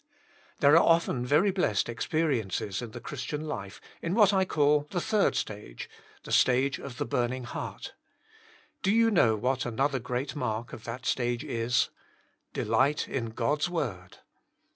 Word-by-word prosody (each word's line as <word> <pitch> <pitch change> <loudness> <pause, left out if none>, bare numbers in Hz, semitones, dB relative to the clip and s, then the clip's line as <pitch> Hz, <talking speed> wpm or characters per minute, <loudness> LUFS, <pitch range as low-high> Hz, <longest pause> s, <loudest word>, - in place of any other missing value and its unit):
There 145 +2 +7
are 165 - +8
often 165 -7 +2
very 155 +9 +4
blessed 175 - +1
experi 135 +2 0
ences 95 +1 -3
in 120 - -6
the 115 - -8
Christian 140 +4 -5
life 100 -10 -6 0.2
in 170 +3 -1
what 210 -3 +5
I 190 -1 +3
call 150 -3 +2
the 180 - -1
third 215 +2 +1
stage 100 - -5 0.2
— - - -27
the - - -9
stage 130 +2 +3
of 130 -3 -8
the 145 - -2
burning 130 -2 -1
heart. 120 - -6 0.9
Do 190 - 0
you 225 +1 +4
know 115 - +4
what 130 +4 0
another 135 +3 0
great 125 +4 -3
mark 115 -4 -3
of 110 - -9
that 125 +2 -6
stage 120 -1 0
is? 115 +1 0 0.6
Delight 130 +7 +1
in 120 -4 -2
God's 145 +8 0
word. 115 - -4
130 Hz, 165 wpm, -28 LUFS, 115-150 Hz, 0.9 s, are